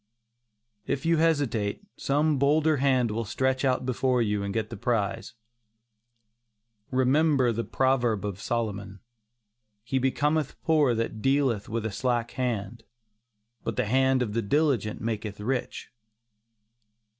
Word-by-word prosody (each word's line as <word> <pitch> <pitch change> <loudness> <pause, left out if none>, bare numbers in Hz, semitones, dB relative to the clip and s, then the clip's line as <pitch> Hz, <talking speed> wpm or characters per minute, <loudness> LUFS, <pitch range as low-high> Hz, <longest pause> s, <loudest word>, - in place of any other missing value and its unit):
If 135 - -2
you 165 0 +3
hesitate, 145 - 0
some 145 +1 +1
bolder 150 +2 +3
hand 130 -4 +2
will 115 +2 -2
stretch 130 +4 -1
out 130 -1 +1
before 130 0 +1
you 105 -3 0
and 100 0 -3
get 110 +1 -2
the - - -5
prize. 115 0 -2 1.5
Remember 130 0 +3
the 115 +1 -2
proverb 120 -6 +1
of 100 -1 -5
Solomon: 100 -4 -3 0.8
"He 130 +3 -1
becometh 145 +3 0
poor 150 -7 +3
that 115 -1 -3
dealeth 135 -6 +1
with 115 0 -2
a 110 - -2
slack 120 +2 -1
hand; 120 -3 -3 0.8
but - - -3
the 125 - 0
hand 130 +3 +2
of 105 -4 -4
the 115 - 0
diligent 125 -2 0
maketh 110 -2 -4
rich." 125 +4 -3
125 Hz, 130 wpm, -27 LUFS, 110-135 Hz, 1.5 s, you